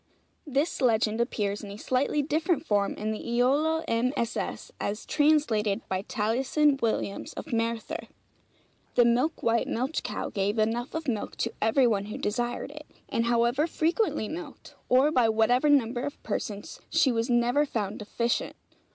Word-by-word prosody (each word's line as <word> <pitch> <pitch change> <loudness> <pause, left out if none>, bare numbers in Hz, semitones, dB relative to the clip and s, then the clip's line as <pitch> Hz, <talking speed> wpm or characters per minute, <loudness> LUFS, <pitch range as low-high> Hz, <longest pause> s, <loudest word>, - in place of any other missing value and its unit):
This 285 +2 0
legend 225 -2 +2
appears, 210 -4 -1
in 205 - -7
a 200 - -8
slightly 265 +5 0
different 315 +1 0
form, 205 -4 +1
in 215 +1 -2
the 215 - -3
'Iolo 280 +7 +1
MSS.,' 235 0 -1
as 210 +2 -3
translated 290 -10 +2
by 185 0 -1
Taliesin 260 +7 +1
Williams, 220 -3 -2
of - - -7
Merthyr: 230 0 -2 0.9
'The 240 - +6
milk 250 +7 +1
white 230 0 +2
milch 260 +7 -1
cow - - -4
gave 205 +2 -1
enough 230 +5 0
of 320 -1 -3
milk 225 -5 -2
to - - -2
every 230 +5 +4
one 205 -4 +1
who 210 - -6
desired 240 +5 -2
it; 300 0 -11 0.2
and 230 - 0
however 240 +6 +2
frequently 330 - 0
milked, 330 +8 -8 0.2
or 260 +4 +5
by 245 -6 +3
whatever 235 +6 +3
number 245 -4 +3
of 285 +1 -6
persons, 205 -1 -4
she 315 -5 +3
was 230 0 -1
never 245 +4 +3
found 215 -8 -3
deficient. 235 +3 -1
240 Hz, 155 wpm, -28 LUFS, 220-285 Hz, 0.9 s, The